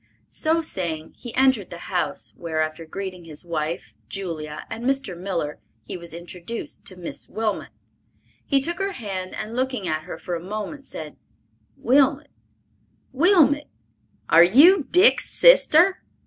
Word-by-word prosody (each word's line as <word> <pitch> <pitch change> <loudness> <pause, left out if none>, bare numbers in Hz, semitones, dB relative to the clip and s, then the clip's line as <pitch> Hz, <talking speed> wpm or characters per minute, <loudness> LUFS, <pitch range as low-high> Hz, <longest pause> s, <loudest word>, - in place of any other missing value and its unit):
So 325 +1 +1
saying, 165 - -3
he 240 - -7
entered 260 -7 +3
the 175 - -8
house, 180 -2 -2
where 165 -2 -4
after 155 +1 -2
greeting 185 0 -6
his 155 +1 -6
wife, 155 -8 -3 0.2
Julia 155 -3 -5
and 225 +1 -7
Mr. 270 -7 0
Miller, 170 -5 -3 0.2
he - - -7
was 170 -1 -8
introduced 175 +6 -7
to 185 - -7
"Miss 180 -2 -7
Wilmot." 220 -1 -2 0.7
He 275 -2 +2
took 340 +6 -1
her 390 0 -1
hand 195 - -5
and 215 +2 -5
looking 255 -6 -1
at 155 -1 -2
her - - -7
for 180 - -6
a 170 - -1
moment, 215 +8 -6
said, 155 -2 -8 0.6
"Wilmot, 270 +2 +2 0.8
Wilmot! 295 -2 +4 0.6
Are 165 +1 +7
you 290 - +6
Dick's 365 +5 +5
sister?" 385 -7 +5
195 Hz, 145 wpm, -23 LUFS, 170-275 Hz, 0.8 s, Are